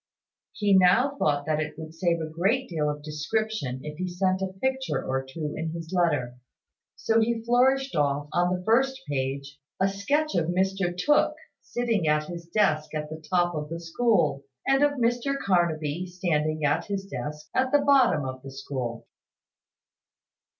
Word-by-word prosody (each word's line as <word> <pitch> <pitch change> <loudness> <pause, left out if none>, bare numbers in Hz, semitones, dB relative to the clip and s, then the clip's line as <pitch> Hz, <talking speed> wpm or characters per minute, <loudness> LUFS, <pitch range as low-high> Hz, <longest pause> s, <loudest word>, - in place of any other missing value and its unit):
He 205 -2 +2
now 230 +10 +5
thought 145 -1 +1
that 155 0 0
it 155 -1 -4
would 160 0 -8
save 170 0 0
a - - -2
great 205 +11 +1
deal 155 -4 -1
of 150 0 -5
description 155 - -2
if 150 +1 -7
he 185 - -1
sent 185 +1 0
a 190 -1 -2
picture 265 +2 -1
or 135 0 -1
two 150 +3 -5
in 160 0 -3
his 165 +1 -7
letter: 145 -9 +1 0.6
so 225 0 +2
he 225 0 0
flourished 265 +3 +2
off, 145 -1 +1
on 175 0 +2
the 180 0 -2
first 265 +5 +2
page, 140 +1 -3 0.2
a 190 - +3
sketch 285 +11 0
of 165 -2 +1
Mr 185 0 0
Tooke 295 +11 +3 0.3
sitting 230 -8 -1
at 150 0 +3
his 170 +1 -8
desk 160 -6 +1
at 150 0 -4
the 155 0 -8
top 175 -1 +2
of 150 -1 -4
the 165 +1 -4
school, 165 - +1 0.2
and 270 +1 +3
of 290 0 +4
Mr 245 +2 0
Carnaby 170 - 0
standing 155 -4 -1
at 145 +3 +1
his 200 -1 -3
desk 150 -1 -6
at 260 0 +1
the 290 -1 +4
bottom 260 - +4
of 130 0 -5
the 135 - -9
school. 130 -3 -5
175 Hz, 170 wpm, -26 LUFS, 150-220 Hz, 0.6 s, now